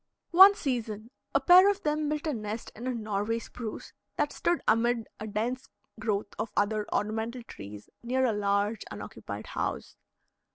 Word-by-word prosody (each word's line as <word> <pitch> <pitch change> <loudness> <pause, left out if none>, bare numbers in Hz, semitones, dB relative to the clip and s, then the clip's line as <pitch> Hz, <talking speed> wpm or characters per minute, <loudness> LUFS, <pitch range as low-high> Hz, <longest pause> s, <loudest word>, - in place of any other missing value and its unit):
One 385 +3 +9
season 230 - -3 0.2
a - - +6
pair 370 +2 +8
of 405 0 -1
them 300 0 0
built 300 +1 -2
a 310 - 0
nest 215 -1 -5
in 240 +4 -6
a - - +1
Norway 215 0 -1
Spruce 230 -1 -7 0.2
that - - 0
stood 345 -1 +1
amid 230 +1 +2
a 215 - -5
dense 235 +5 -3 0.3
growth 210 -2 -2
of 220 0 -2
other 210 +1 +1
ornamental 220 +3 -2
trees 105 - -10
near 260 +2 +1
a 235 - +2
large 205 +1 0
unoccupied - - -7
house. - - -4
230 Hz, 160 wpm, -29 LUFS, 210-260 Hz, 0.3 s, One